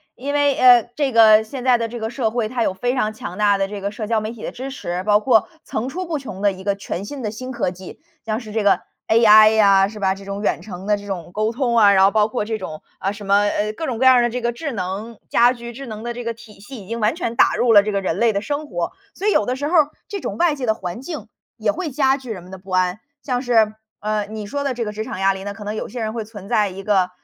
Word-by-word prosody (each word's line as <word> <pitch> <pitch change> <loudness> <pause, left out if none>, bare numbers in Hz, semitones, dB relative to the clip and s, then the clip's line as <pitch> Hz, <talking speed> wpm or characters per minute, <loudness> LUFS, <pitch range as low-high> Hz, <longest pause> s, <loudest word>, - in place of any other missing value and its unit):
因 280 +3 -4
为， 285 -1 +3
呃， 245 -2 +7
这 285 -3 0
个 220 -2 +7
现 250 +3 -7
在 255 -1 +5
的 230 -1 -2
这 235 +1 -7
个 220 - -2
社 240 -2 -1
会， 225 -1 -1
它 240 +2 -3
有 195 - +1
非 245 +6 -1
常 215 -5 0
强 180 -4 -7
大 205 -1 +3
的 195 0 0
这 205 0 -7
个 200 - -2
社 215 +1 -6
交 220 +1 +1
媒 215 +1 -4
体 230 -2 -11
的 - - -4
支 260 +2 -6
持， 180 -10 -4
包 210 +1 +4
括 225 -2 +3 0.2
层 235 +4 -3
出 365 +6 -4
不 325 -3 -3
穷 235 -8 -8
的 205 -1 +3
一 190 0 -10
个 200 0 0
全 195 -2 -5
新 265 +5 -7
的 210 - -2
新 255 +4 -7
科 235 -7 -1
技， 185 0 -11 0.2
像 220 -1 -2
是 220 -3 -10
这 220 +1 0
个 205 - +4 0.3
AI 215 -1 +7
呀， 195 -2 +5
是 210 +1 -9
吧， 190 -1 +2
这 195 +1 -11
种 200 +1 -5
远 - - 0
程 185 -3 -9
的 210 0 +2
这 205 0 -11
种 175 -4 -5
沟 215 +3 0
通 240 0 -1
啊， 210 -3 +6
然 190 -1 +5
后 195 - +4
包 210 -1 +3
括 220 -2 -3
这 220 0 -3
种， 155 -5 -7 0.2
啊， 195 - -1
什 205 0 -9
么， 200 +1 +4
呃， 210 +1 -1
各 320 +8 -5
种 245 -4 -2
各 260 - +1
样 260 - +8
儿 - - +5
的 240 - +2
这 250 +2 -3
个 240 0 0
智 290 +5 -5
能 200 +3 -5
家 240 +1 +5
居， 235 -1 -8
智 270 +3 -8
能 215 -1 -7
的 240 0 -3
这 245 +1 -6
个 230 0 -3
体 215 -2 -15
系 210 0 -10
已 - - -17
经 230 +2 -4
完 215 +6 +1
全 235 -9 -3
打 - - +4
入 240 -2 +3
了 205 - +9
这 210 +1 -3
个 200 - 0
人 185 -3 -2
类 230 -1 +3
的 200 - 0
生 290 +5 -3
活， 175 -6 -3 0.2
所 400 - -3
以 - - +4
有 210 - +2
的 250 - 0
时 285 +2 -3
候 345 +3 +2
儿 300 -1 +3 0.2
这 405 - -5
种 - - -4
外 340 -2 +3
界 270 -4 -4
的 220 - +2
环 180 +1 -6
境 315 +3 -7 0.3
也 - - +1
会 370 -4 -4
加 270 -1 +2
剧 260 -3 -11
人 190 -6 -5
们 180 - -14
的 190 - -9
不 190 +1 -16
安。 185 +1 +1 0.2
像 250 -3 -1
是， 225 -4 +3 0.3
呃， 210 -1 -2
你 215 -1 -6
说 280 +8 -3
的 275 -3 -1
这 235 -1 -2
个 210 - -3
职 215 +1 -4
场 205 - -6
压 195 0 +3
力 190 0 -8
呢， 200 0 -5
可 210 - -9
能 205 +1 -4
有 - - -4
些 245 - -6
人 220 0 -2
会 230 -1 -3
存 210 -3 -11
在 210 -1 +2
一 190 +1 -8
个， 190 -3 +2
220 Hz, 335 characters per minute, -21 LUFS, 200-245 Hz, 0.3 s, 了